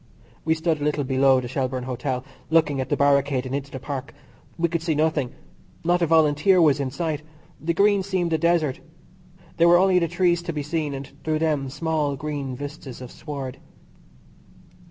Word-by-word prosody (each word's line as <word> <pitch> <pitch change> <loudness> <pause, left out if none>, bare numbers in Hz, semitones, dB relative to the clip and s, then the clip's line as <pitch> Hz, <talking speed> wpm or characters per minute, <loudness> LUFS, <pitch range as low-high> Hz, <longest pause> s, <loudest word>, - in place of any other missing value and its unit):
We 160 0 +2
stood 160 -2 0
a - - -1
little 150 -1 0
below 135 0 +4
the 125 - -5
Shelbourne 130 0 -2
Hotel, 125 +1 -3 0.2
looking 155 -4 +3
at 130 - -5
the - - +1
barricade 140 -2 +2
and 130 - -5
into 140 0 -3
the 130 - -7
Park. 135 0 -6 0.4
We 170 0 +2
could 170 0 -2
see 165 -2 0
nothing. 150 -4 +1 0.5
Not 175 +1 +2
a 170 - +3
Volunteer 160 +3 +4
was 150 -4 +4
in 140 -2 -1
sight. 155 +1 -3 0.4
The 170 +1 -1
Green 200 +1 +4
seemed 185 -3 -1
a 160 - +2
desert. 165 -5 +1 0.8
There 170 - +5
were 175 0 +7
only 185 0 +4
the 170 - +1
trees 175 0 +2
to 170 -1 -4
be 150 -1 -3
seen, 150 -1 -2
and 135 0 -6 0.2
through 155 -1 0
them 150 -4 0
small 150 0 -1
green 140 -2 -4
vistas 145 -2 -8
of 125 -1 -9
sward. 140 -4 -6
150 Hz, 190 wpm, -24 LUFS, 135-165 Hz, 0.8 s, were